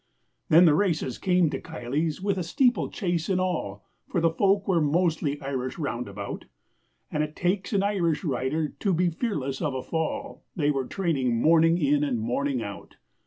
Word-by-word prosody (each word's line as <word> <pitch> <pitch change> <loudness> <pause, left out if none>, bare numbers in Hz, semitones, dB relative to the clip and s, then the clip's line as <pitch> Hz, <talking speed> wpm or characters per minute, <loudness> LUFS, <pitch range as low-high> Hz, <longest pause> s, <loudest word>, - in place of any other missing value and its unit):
Then 170 +3 +7
the 155 - +6
races 160 - 0
came 180 -4 +2
to - - -4
Kiley's 155 +1 -3
with 200 -2 0
a - - -1
steeplechase 175 - 0
and 185 -1 +2
all, 105 - -2 0.2
For 175 - 0
the 165 0 +3
folk 195 +3 +2
were 175 -4 +3
mostly 155 -2 +1
Irish 130 -2 -3
round 125 -7 -3
about, 100 0 -6 0.7
And 150 - 0
it 150 0 -3
takes 185 +1 -1
an 200 -2 +2
Irish 175 -6 0
rider 150 +1 -1
to 195 -3 +1
be 175 +1 +2
fearless 150 - -3
of 150 -5 -1
a 130 - -3
fall, 275 - -3
They 150 -5 +2
were 135 -3 -2
training 135 -11 0
morning 165 +4 +5
in 145 -2 +2
and 130 -5 0
morning 125 +2 -1
out. 100 -4 -8
160 Hz, 175 wpm, -26 LUFS, 135-180 Hz, 0.7 s, Then